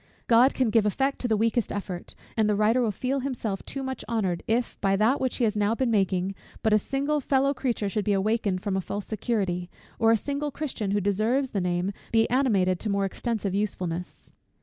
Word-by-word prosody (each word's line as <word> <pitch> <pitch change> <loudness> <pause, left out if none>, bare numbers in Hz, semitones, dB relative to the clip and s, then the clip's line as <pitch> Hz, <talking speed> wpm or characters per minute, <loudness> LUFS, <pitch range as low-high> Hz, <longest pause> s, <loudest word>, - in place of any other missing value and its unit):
God 245 +3 +5
can 255 -4 +1
give 210 -1 +4
effect 270 +7 0
to 245 - -1
the 220 -2 +2
weakest 230 +1 +1
effort; 190 -3 -5 0.2
and 220 -2 +2
the 210 - +2
writer 215 +4 +3
will 235 - +2
feel 260 +7 -1
himself 240 -7 -3
too 275 - -5
much 265 0 -4
honoured, 195 -7 0
if 235 +2 -1
by 195 -1 +3
that 220 +7 +2
which 260 -1 0
he 250 - 0
has 215 -2 +2
now 210 +2 +1
been 250 -1 0
making, 190 -2 +1 0.3
but 220 - +3
a 215 - +6
single 280 +6 -1
fellow 275 +1 +2
creature 245 -6 -1
should 205 +1 -2
be 210 - +2
awakened 200 -1 0
from 200 -2 -1
a 190 - 0
false 200 +2 -5
security, 190 -5 -2 0.3
or 225 0 +5
a 225 - +5
single 285 +6 -3
Christian, 270 -8 -3
who 205 +1 +1
deserves 220 +7 +1
the 200 - -1
name, 180 +2 0 0.2
be 225 0 +4
animated 200 -9 +2
to 220 - -3
more 200 -1 +1
extensive 205 -1 -2
usefulness. 180 -4 -3
215 Hz, 215 wpm, -26 LUFS, 195-250 Hz, 0.3 s, a